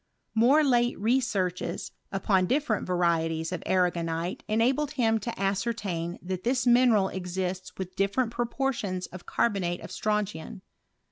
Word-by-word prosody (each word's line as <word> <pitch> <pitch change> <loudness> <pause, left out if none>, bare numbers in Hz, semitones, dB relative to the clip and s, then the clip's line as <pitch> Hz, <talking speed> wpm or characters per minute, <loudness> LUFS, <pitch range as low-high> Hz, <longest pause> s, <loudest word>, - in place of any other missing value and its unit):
M(»e 260 +8 +5
late 240 -3 +2
researches 200 -7 0 0.2
upon 190 -1 +2
different 260 -5 0
varieties 165 -2 +1
of 180 - -3
arragonite 175 -2 0
•enabled 260 +7 +2
him 225 -5 +2
to 230 +1 -5
ascertain 195 -4 -1
that 185 0 -4
this 250 +1 +1
inineral 240 -5 +5
exists 185 0 -3
with 185 -1 -6
different 200 +5 +1
proportions 235 -6 -2
of 185 - -11
carbonate 185 -6 0
of - - -9
strontian. 210 -2 -2
195 Hz, 125 wpm, -28 LUFS, 180-235 Hz, 0.2 s, M(»e